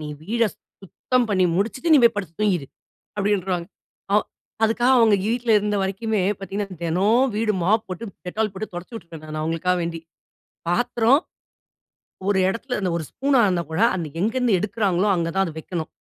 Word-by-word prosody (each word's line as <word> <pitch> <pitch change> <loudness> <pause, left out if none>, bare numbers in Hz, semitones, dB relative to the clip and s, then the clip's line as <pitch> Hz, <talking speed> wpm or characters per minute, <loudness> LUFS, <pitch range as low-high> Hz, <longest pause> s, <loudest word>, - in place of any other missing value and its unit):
"நீ - - -5 0.2
வீட 230 +4 0 0.4
சுத்தம் 245 +6 0
பண்ணி 185 -2 +3
முடிச்சுட்டு, 255 - 0
நீ 295 - +8
போய் 235 - +5
படுத்து 185 -5 -4
தூங்கிரு." 180 -9 +1 0.5
அப்படின்ருவாங்க. 190 -4 0 0.5
அ - - +4 0.5
அதுக்காக 240 +4 +3
அவுங்க 220 -3 +5
வீட்டுல 235 0 0
இருந்த 210 0 -1
வரைக்குமே 200 +1 -1 0.2
பார்த்தீங்கன்னா, 195 0 -5
தினம் 205 +10 +2
வீடு 215 -1 +1
மாப் 215 +4 +2
போட்டு 185 +5 -5 0.2
Dettol 215 +4 -1
போட்டு 215 +3 -5
தொடச்சி 175 +6 -7
விட்டுருவேன், 170 -6 -9
நான் 155 0 -4
அவுங்களுக்காக 165 +3 0
வேண்டி. 165 -1 -4 0.7
பாத்திரம், 245 - +3 1.1
ஒரு 200 -2 +3
இடத்துல, 230 +4 -3
அந்த 185 - 0
ஒரு 160 - -4
ஸ்பூனா 270 -2 +2
இருந்தா 180 -2 0
கூட 170 +7 -1
அன்னைக்கு 165 -3 -5
எங்கேருந்து 235 -2 +2
எடுக்குறாங்களோ, 200 -2 0
அங்கதான் 170 +3 0
அது 160 - -6
வைக்கணும். 165 -1 -5
200 Hz, 155 wpm, -23 LUFS, 175-230 Hz, 1.1 s, நீ